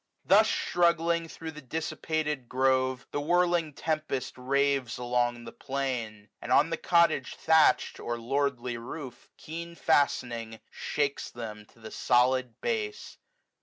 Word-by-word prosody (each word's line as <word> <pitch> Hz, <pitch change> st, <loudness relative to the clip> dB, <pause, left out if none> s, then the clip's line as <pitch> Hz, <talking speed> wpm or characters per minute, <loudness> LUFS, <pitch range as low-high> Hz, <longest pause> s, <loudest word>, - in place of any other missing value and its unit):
Thus -, -, +6 dB
struggling 170 Hz, -1 st, +1 dB
thro' 160 Hz, 0 st, -7 dB
the 150 Hz, -1 st, -10 dB
dissipated 150 Hz, -1 st, -3 dB
grove, 130 Hz, 0 st, +1 dB
1S5 -, -, -47 dB
The 145 Hz, -, -2 dB
whirling 175 Hz, -1 st, +2 dB
tempest 155 Hz, -3 st, -2 dB
raves 135 Hz, -1 st, 0 dB
along 120 Hz, -1 st, 0 dB
the -, -, -8 dB
plain; 125 Hz, -6 st, -4 dB
And -, -, -6 dB
on -, -, +4 dB
the -, -, 0 dB
cottage 170 Hz, -1 st, +2 dB
thatch'd, 160 Hz, -1 st, +3 dB
or 120 Hz, 0 st, -3 dB
lordly 125 Hz, 0 st, -1 dB
roof. 125 Hz, +2 st, -8 dB
Keen 170 Hz, +2 st, -7 dB
fastening, 120 Hz, -8 st, 0 dB
shakes 145 Hz, -1 st, -2 dB
them 105 Hz, -3 st, -8 dB
to -, -, -23 dB
the 110 Hz, -1 st, -10 dB
solid 125 Hz, 0 st, +2 dB
base. 440 Hz, -2 st, -3 dB
135 Hz, 130 wpm, -29 LUFS, 120-160 Hz, -, Thus